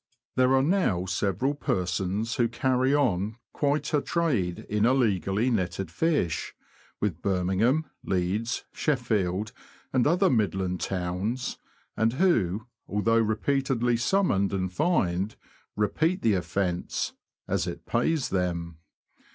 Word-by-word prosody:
There 130 +1 +4
are 130 - +4
now 145 - +1
several 100 +9 0
persons 95 - -1
who 120 - +3
carry 130 +2 +1
on 110 -7 +1 0.2
quite 145 +1 0
a 150 - +3
trade 125 - -1
in 105 0 0
illegally 110 - +2
netted 95 -4 -1
fish, 115 - 0 0.4
with 100 -7 -2
Birmingham, 100 - +1 0.2
Leeds, 95 +6 -1
Sheffield, 110 - 0 0.4
and 130 0 +3
other 180 +5 +4
Midland 95 - 0
towns, 95 +7 -2 0.4
and 115 +1 +2
who, 115 - +2 0.2
although 115 +3 +2
repeatedly 120 +2 +1
summoned 115 - +2
and 95 -1 -2
fined, 100 - +1 0.4
repeat 160 - +1
the 110 - +4
offence, 90 0 -1 0.3
as - - 0
it - - -6
pays 160 -5 +1
them. 85 -3 -2
110 Hz, 115 wpm, -27 LUFS, 95-130 Hz, 0.4 s, There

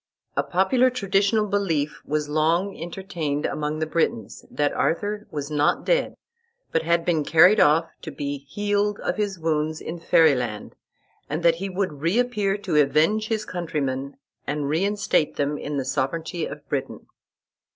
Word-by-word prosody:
A - - +3
popular 240 +8 +2
traditional 205 -2 +1
belief 170 -8 -1
was 150 0 -1
long 165 +6 +1
entertained 165 -4 -4
among 150 0 -2
the 155 - -1
Britons, 115 -9 -2
that 145 -1 0
Arthur 205 +5 -1
was 145 -1 -5
not 150 0 +1
dead, - - +1 0.6
but 165 - +1
had 170 +1 +1
been 160 -4 +1
carried 180 +8 +6
off 160 +3 +4
to 160 - -6
be 140 -1 -4
healed 205 +2 0
of - - -2
his 205 -3 -1
wounds 155 -1 -1
in 170 +2 -6
Fairy 165 -2 +5
land, 120 -5 -4 0.6
and 155 +3 -3
that 165 -1 +4
he 195 - -2
would 185 -6 -3
reappear 205 +2 +1
to 185 -6 -1
avenge 155 +10 +2
his 215 -2 -2
countrymen 145 -7 -3 0.3
and 145 -1 -2
reinstate 195 -1 +1
them 145 +1 -1
in 145 0 -4
the 135 - -2
sovereignty 160 +5 -2
of 145 0 -10
Britain. 135 -1 -4
165 Hz, 155 wpm, -24 LUFS, 150-195 Hz, 0.6 s, carried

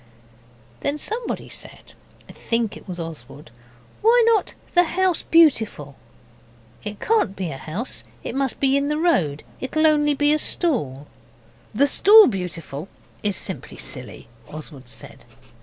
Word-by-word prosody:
Then 285 +1 -1
someone 450 +9 -4
said - - -7 0.3
I - - -11
think 230 -2 -2
it - - -13
was 180 -2 -6
Oswald 155 -4 -8 0.5
'Why 470 +2 +5
not 455 -4 +2 0.2
"The 355 - +6
House 365 0 +1
Beautiful"?' 220 - +3 0.9
'It 210 0 -5
can't 430 - +1
be 185 -4 -4
a 135 - -6
house, 185 - -4 0.2
it - - -5
must 270 -2 -1
be 270 0 +3
in 280 0 +1
the 300 - 0
road. 180 - +1 0.2
It'll 310 +4 0
only 295 -1 +3
be 290 +1 +4
a 305 - +1
stall.' 150 - 0 0.7
'The 280 - +4
"Stall 420 +9 +7
Beautiful" 170 - -4 0.3
is 205 -2 0
simply - - -5
silly,' - - -6 0.2
Oswald 145 -4 -9
said. - - -11
260 Hz, 140 wpm, -22 LUFS, -, 0.9 s, Stall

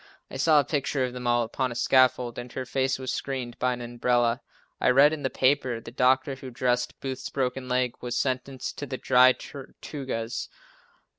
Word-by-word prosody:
I - - -5
saw 150 +2 +5
a - - +3
picture 140 -2 0
of 125 - -5
them 125 -1 -5
all 120 0 +3
upon 130 +3 -2
a - - -6
scaffold 125 -1 +3
and 120 0 -8
her 130 - -4
face 130 +1 0
was 130 -1 -4
screened 130 -3 -4
by 125 0 +1
an 120 - -6
umbrella. 120 0 +1 0.4
I - - +3
read 140 +4 +6
in 155 - -4
one 130 - -1
paper 130 -2 +1
that 115 - -9
the - - -8
doctor 130 +2 +2
who 135 0 -8
dressed 125 0 -1
Booth's 130 -1 -4
broken 130 -1 -2
leg 125 -1 +1
was 125 -1 -3
sentenced 130 0 -3
to 145 - -5
the 130 -1 -4
Dry 130 +1 +5
Tortugas. 130 -4 -6
130 Hz, 200 wpm, -26 LUFS, 125-135 Hz, 0.4 s, read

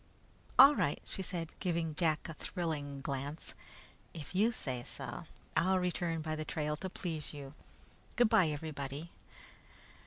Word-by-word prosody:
"All 275 +3 +11
right," 145 - +1
she - - -4
said, 170 -3 -3
giving 170 -3 0
Jack 155 -1 +1
a 165 - -5
thrilling 150 -5 -3
glance. 140 +3 -4 0.6
"If 155 -1 -7
you 210 +5 +4
say 130 - -3
so, - - -6 0.3
I'll 190 +2 +4
return 175 -3 0
by 155 0 -1
the 155 - -2
trail 150 -1 -1
to 190 - -4
please 160 -5 -4
you. 140 -1 -8 0.6
Good 240 -1 +6
bye, 215 -7 +6
everybody." 150 0 -4
160 Hz, 145 wpm, -34 LUFS, 145-180 Hz, 0.6 s, All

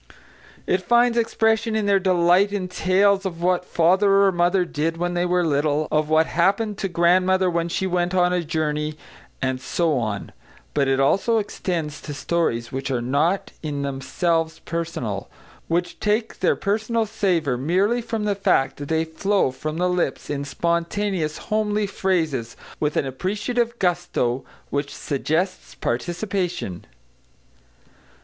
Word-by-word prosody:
It 185 - +1
finds 240 +4 +3
expression 225 -1 +1
in 215 -1 0
their 200 -1 +4
delight 185 +1 +3
in 195 -3 -2
tales 195 +2 +2
of 180 -4 -4
what 180 0 +2
father 195 +4 +3
or 195 - +4
mother 175 +1 +2
did 165 0 -2
when 175 +1 -1
they 175 0 0
were 180 0 +2
little, 150 0 +1
of 155 0 +1
what 155 +1 +4
happened 200 +5 +1
to 195 - -1
grandmother 185 +1 +3
when 170 0 -1
she 190 - -1
went 180 0 0
on 180 -1 +3
a 180 -1 0
journey, 150 -1 -1 0.5
and 130 -1 -1
so 160 -1 0
on, 105 -3 -3 0.4
but 140 -2 +2
it 135 0 +2
also 195 +11 +3
extends 170 -8 -3
to 145 - -6
stories 140 -7 -1
which 135 +1 -3
are 130 -2 0
not 145 +10 0
in 145 -3 -3
themselves 160 +5 -1
personal: 160 -12 -3 0.4
which 175 +1 -1
take 215 +2 0
their - - +3
personal 220 +2 0
savour 180 - 0
merely 190 - +1
from 225 -2 -3
the 210 -1 +1
fact 190 -9 +1
that 145 - -6
they 160 +1 +1
flow 190 -1 +1
from 155 +4 -5
the 180 +1 +1
lips 180 -8 -1
in 140 -1 -2
spontaneous, 170 +2 -1
homely 215 -1 0
phrases, 160 - -1 0.2
with 150 -1 0
an - - +1
appreciative 210 - -2
gusto 175 - 0 0.3
which 140 0 -2
suggests 160 +6 -2
participation. 175 - -3
175 Hz, 150 wpm, -23 LUFS, 150-195 Hz, 0.5 s, their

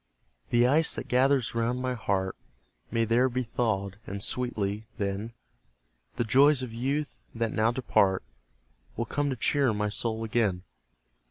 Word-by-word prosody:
The 120 0 +4
ice 150 +5 +3
that - - -5
gathers 130 -1 +2
round 115 +2 0
my 130 0 -1
heart 100 -5 -1 0.5
May 115 -1 +1
there 120 +4 +3
be 125 +1 -1
thawed; 105 -4 -2
and 100 +1 -4
sweetly, 110 -4 -2
then, 100 +2 -2 0.8
The - - 0
joys 135 +4 +4
of 120 -3 -6
youth, 140 +5 -2
that 115 -1 -1
now 110 +1 +3
depart, 100 -6 +2 0.7
Will 115 - -1
come 145 +5 -1
to 135 - -1
cheer 130 -1 +2
my 105 0 0
soul 110 +1 -2
again. 110 -5 0
115 Hz, 150 wpm, -28 LUFS, 105-125 Hz, 0.8 s, The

